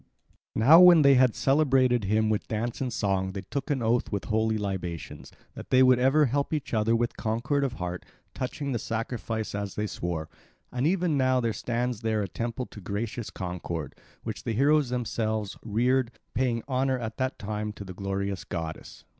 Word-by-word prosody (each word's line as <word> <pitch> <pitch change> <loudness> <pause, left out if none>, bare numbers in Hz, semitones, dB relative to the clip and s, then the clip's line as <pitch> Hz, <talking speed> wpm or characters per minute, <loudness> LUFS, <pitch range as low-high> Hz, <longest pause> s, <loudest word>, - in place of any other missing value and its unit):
Now 140 +10 +7
when 175 -3 +8
they 140 0 +7
had 130 -3 +4
celebrated 130 -5 +3
him 110 +2 +2
with 105 - -1
dance 115 +3 -3
and 130 -2 -1
song 95 -3 -1
they 95 - -5
took 140 +2 -4
an 135 -5 0
oath 115 +2 +1
with 100 -2 -2
holy 110 0 +1
libations, 95 -5 -5 0.2
that - - -10
they 130 0 +6
would 130 -1 +5
ever 135 +4 +4
help 140 +4 -1
each 150 - -5
other 115 +1 +2
with 120 +1 -1
concord 125 +6 0
of 135 -3 -1
heart, 90 -5 -5 0.3
touching 140 +2 -4
the 120 - -1
sacrifice 115 -1 -3
as 100 -1 -4
they 105 - -1
swore; 85 -5 -3 0.4
and 125 +3 0
even 175 -4 +1
now 130 -1 +3
there 115 -2 0
stands 120 0 -2
there 110 -2 0
a - - -3
temple 120 +6 -4
to 105 - -12
gracious 110 +5 -4
Concord, 85 -4 -5 0.3
which - - -5
the 115 - -2
heroes 140 +3 +3
themselves 110 -4 -2
reared, 120 +3 +1 0.2
paying 120 -1 0
honour 130 0 +1
at 110 -2 -5
that 130 0 -1
time 105 +1 -4
to 100 - -8
the 95 - -8
glorious 100 0 -3
goddess. 80 -1 -6
115 Hz, 185 wpm, -27 LUFS, 105-130 Hz, 0.4 s, when